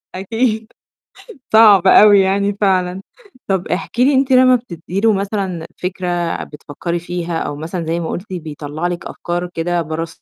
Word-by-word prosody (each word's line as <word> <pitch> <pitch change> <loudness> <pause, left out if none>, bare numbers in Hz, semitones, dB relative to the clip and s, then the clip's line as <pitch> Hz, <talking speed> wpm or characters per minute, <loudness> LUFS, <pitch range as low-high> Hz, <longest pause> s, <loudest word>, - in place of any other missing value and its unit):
أكيد، 220 +3 -1 0.9
صعب 205 -4 +7
أوي 205 0 +7
يعني 200 +1 0
فعلًا، 185 -1 +1 0.5
طب 190 -2 -1
احكي 195 +7 -1
لي 285 - +3
أنتِ 265 0 +1
لمّا 255 0 +6
بتدّي 185 -5 -5
له 225 -1 +4
مثلًا 195 -4 -3
فكرة 175 -2 -3
بتفكّري 160 +4 -5
فيها، 175 -1 -4
أو 145 - -4
مثلًا 165 +3 -5
زي 165 +1 -1
ما 165 - -4
قُلتي 185 0 -5
بيطلّع 155 +1 -5
لِك 175 -1 -5
أفكار 175 +1 -4
كده 170 +1 -1
برّه 160 +1 -4
180 Hz, 155 wpm, -17 LUFS, 170-205 Hz, 0.9 s, صعب